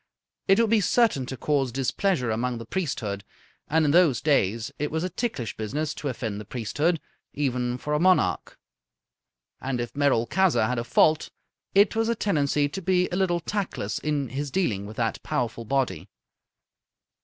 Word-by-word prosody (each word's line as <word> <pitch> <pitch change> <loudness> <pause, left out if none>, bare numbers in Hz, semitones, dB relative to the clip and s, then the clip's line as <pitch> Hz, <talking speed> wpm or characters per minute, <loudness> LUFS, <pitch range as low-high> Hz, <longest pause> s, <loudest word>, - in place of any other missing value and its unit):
It 195 +2 +5
would 230 -2 +3
be 225 -2 +4
certain 195 - +2
to 130 - -5
cause 140 -2 0
displeasure 130 - 0
among 120 +2 -1
the 115 - -8
priesthood; 115 - -3 0.4
and 160 +1 +2
in 145 - +3
those 160 -8 +4
days 115 -7 +1
it 150 +1 -1
was 160 +1 -2
a 185 - -2
ticklish 175 - -3
business 145 +8 -3
to 150 - -5
offend 110 -5 -4
the - - -7
priesthood, 145 - -1 0.4
even 125 -3 -1
for 150 +3 -4
a 150 - +2
monarch. 170 - +2 1.0
And, 130 -2 -2
if 120 0 -4
Merolchazzar 145 +3 +2
had 125 0 -1
a - - -2
fault, 155 +5 +3 0.5
it 200 +3 +5
was 225 0 +1
a 235 - +1
tendency 145 -8 +1
to 190 +7 -6
be 180 0 +2
a - - -1
little 180 -2 +1
tactless 180 - -3
in 145 -4 -1
his 140 +3 -3
dealings 110 - -1
with 110 - -10
that 115 -2 -1
powerful 115 -1 -2
body. 135 +2 -1
145 Hz, 170 wpm, -26 LUFS, 120-175 Hz, 1.0 s, It